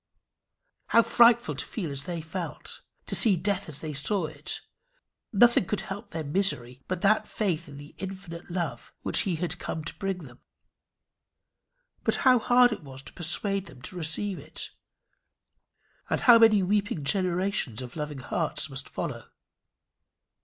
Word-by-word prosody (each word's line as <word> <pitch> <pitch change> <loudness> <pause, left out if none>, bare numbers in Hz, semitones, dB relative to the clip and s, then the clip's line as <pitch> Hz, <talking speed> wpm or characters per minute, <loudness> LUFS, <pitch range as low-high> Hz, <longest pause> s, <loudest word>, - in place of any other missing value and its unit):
How 230 - +5
frightful 235 +1 +5
to - - -4
feel 175 -9 -5
as 140 0 -4
they 175 -2 -4
felt! 165 +2 -6 0.2
to - - -5
see 215 -6 +5
death 200 +1 -1
as 145 - -7
they 155 -1 -4
saw 170 +6 0
it! 150 -1 -5 0.7
Nothing 235 -1 +5
could 210 - -1
help 200 +4 -7
their 160 -1 -4
misery 140 -7 0
but 185 -1 -3
that 215 +2 +3
faith 175 -6 -1
in 140 - -10
the 145 +1 -11
infinite 190 -3 -7
love 175 -1 -4
which - - +1
he 175 - +1
had 175 +2 -3
come 160 - -4
to 165 - -6
bring 195 -3 -2
them; 125 -1 -14 1.6
but - - +2
how 255 -2 +7
hard 245 +2 +5
it 215 - -4
was 135 -2 -10
to - - -10
persuade 195 +3 +1
them 130 - -13
to 185 - -8
receive 175 +3 -1
it! 155 +3 -7 1.4
And - - 0
how 240 -2 +8
many 215 -3 +6
weeping 205 - 0
generations 180 - 0
of 125 -1 -7
loving 150 -3 -4
hearts - - -1
must - - -6
follow! - - -5
180 Hz, 160 wpm, -28 LUFS, 155-205 Hz, 1.6 s, how